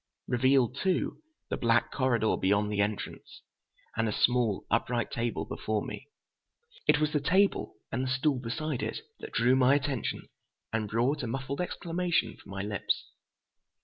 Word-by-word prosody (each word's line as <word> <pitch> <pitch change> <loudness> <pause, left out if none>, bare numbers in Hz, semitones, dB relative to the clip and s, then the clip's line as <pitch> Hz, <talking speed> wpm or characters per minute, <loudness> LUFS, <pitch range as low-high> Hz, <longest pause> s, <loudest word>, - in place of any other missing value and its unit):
Revealed, 130 0 +3
too, 190 - 0 0.3
the - - 0
black 115 0 +2
corridor 120 -5 +2
beyond 100 +2 +2
the 100 -1 +1
entrance, 105 0 -4 0.5
and 115 -1 +1
a - - 0
small, 120 -2 +2
upright 120 +1 +1
table 120 0 -1
before 110 -1 -2
me. - - -7 0.8
It - - +5
was 155 -1 +1
the 150 - +3
table, 190 +7 +2 0.2
and 130 - -1
the 130 - -1
stool 135 +1 +2
beside 130 +3 -3
it, - - -3 0.2
that - - -8
drew 120 +3 +4
my 130 +1 +5
attention 135 -3 -1 0.5
and 110 -2 -1
brought 125 +7 +1
a 120 - -3
muffled 135 +5 -3
exclamation 175 -7 -1
from - - -17
my 100 0 -4
lips. 100 -1 -2
125 Hz, 155 wpm, -30 LUFS, 115-140 Hz, 0.8 s, It